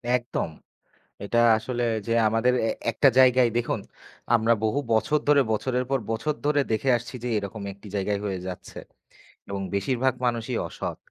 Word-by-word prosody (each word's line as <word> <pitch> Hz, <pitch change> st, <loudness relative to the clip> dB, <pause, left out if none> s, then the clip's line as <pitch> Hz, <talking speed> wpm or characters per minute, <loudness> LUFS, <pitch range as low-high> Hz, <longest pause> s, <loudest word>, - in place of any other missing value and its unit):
একদম, 120 Hz, -8 st, -2 dB, 0.8 s
এটা 120 Hz, +3 st, +1 dB, 0.2 s
আসলে 120 Hz, +2 st, -3 dB, 0.2 s
যে -, -, -2 dB, 0.2 s
আমাদের 115 Hz, +3 st, +2 dB
এ -, -, +1 dB, 0.2 s
একটা 135 Hz, +5 st, +4 dB
জায়গায় 130 Hz, -1 st, +6 dB
দেখুন, 120 Hz, -2 st, -1 dB, 0.6 s
আমরা 115 Hz, 0 st, +3 dB
বহু 110 Hz, +6 st, +1 dB
বছর 110 Hz, +8 st, +2 dB
ধরে, 145 Hz, -1 st, +6 dB
বছরের 125 Hz, +3 st, 0 dB
পর 135 Hz, -1 st, +1 dB
বছর 115 Hz, +7 st, -1 dB
ধরে 145 Hz, -1 st, +3 dB
দেখে 110 Hz, +5 st, 0 dB
আসছি 125 Hz, +2 st, -9 dB
যে, -, -, -2 dB
এরকম 100 Hz, +1 st, -5 dB
একটি 100 Hz, +2 st, -15 dB
জায়গায় 100 Hz, +1 st, -1 dB
হয়ে 95 Hz, -2 st, -2 dB
যাচ্ছে। 90 Hz, -1 st, -8 dB, 0.7 s
এবং 100 Hz, 0 st, -3 dB
বেশিরভাগ 125 Hz, +6 st, +1 dB
মানুষই 120 Hz, 0 st, -1 dB
অসৎ, -, -, -5 dB
120 Hz, 155 wpm, -25 LUFS, 110-130 Hz, 0.8 s, জায়গায়